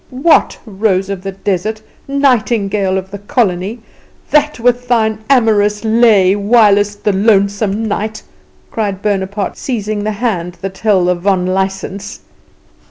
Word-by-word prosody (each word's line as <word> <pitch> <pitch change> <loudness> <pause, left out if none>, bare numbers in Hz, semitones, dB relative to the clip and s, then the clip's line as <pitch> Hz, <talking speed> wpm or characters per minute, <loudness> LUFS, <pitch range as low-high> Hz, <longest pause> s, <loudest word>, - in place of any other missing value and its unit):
"What, 275 +6 +2
rose 195 -2 -1
of 195 -2 -5
the 195 +1 -5
desert, 205 +3 -3 0.2
nightingale 220 -8 +1
of 190 0 -6
the 200 - -7
colony, 205 -2 -1 0.5
that 300 -2 +2
with 245 +1 +1
thine 220 -3 +1
amorous 210 -5 +2
lay 220 -4 +4
whilest 205 -1 +2
the 210 - +1
lonesome 200 +1 +1
night!" 215 +1 -3 0.5
cried 200 -3 -3
Bonaparte, 200 -1 -2
seizing 215 -4 -3
the 215 0 -2
hand 185 -6 -3
that 190 0 -6
held 195 -5 +2
the 180 - +3
vonlicsense. 190 +2 -2
205 Hz, 125 wpm, -14 LUFS, 195-225 Hz, 0.5 s, lay